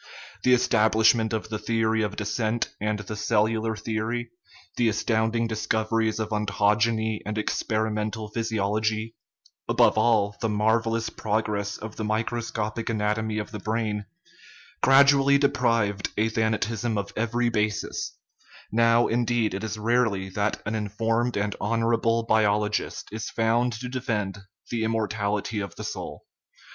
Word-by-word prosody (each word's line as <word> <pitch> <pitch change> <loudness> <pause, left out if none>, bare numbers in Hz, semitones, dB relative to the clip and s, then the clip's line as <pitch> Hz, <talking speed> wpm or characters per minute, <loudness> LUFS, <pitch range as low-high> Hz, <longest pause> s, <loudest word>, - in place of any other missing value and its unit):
The 125 0 +5
establishment 110 -1 +3
of 110 -1 -3
the 110 -1 -3
theory 110 0 +1
of 105 -1 -2
descent 110 +2 -1
and 105 0 0
the 105 +1 -6
cellular 110 +1 +1
theory, 115 +2 -3 0.4
the 120 -2 +3
astounding 110 +1 +1
discoveries 110 0 0
of 110 - -2
ontogeny 105 +1 +1
and 105 +1 -4
experimental 110 0 -1
physiology 110 0 -1 0.6
above - - +4
all, 110 -3 +3
the 115 - 0
marvellous 115 +2 +1
progress 105 -1 -2
of 110 0 -8
the 110 - -3
microscopic 110 0 -2
anatomy 110 0 -1
of 105 0 -4
the 105 - -6
brain, 110 -1 -2 0.7
gradually 140 +1 +6
deprived 115 -8 +1
athanativSm 110 +1 0
of 100 0 -4
every 120 +2 0
basis; 105 -2 -2 0.5
now, 115 +1 +4
indeed, 120 -2 +1
it 100 +2 -4
is 110 0 -3
rarely 110 -4 +1
that 100 +2 -2
an 110 - -2
informed 115 +3 -1
and 100 0 -1
honorable 115 +1 +1
biologist 105 -1 +1
is 110 0 -4
found 115 +2 +1
to 115 +4 -6
defend 110 -6 -2 0.3
the 115 -2 -1
immortality 105 -1 -1
of 100 -1 -5
the - - -7
soul. - - -6
110 Hz, 130 wpm, -26 LUFS, 105-115 Hz, 0.7 s, gradually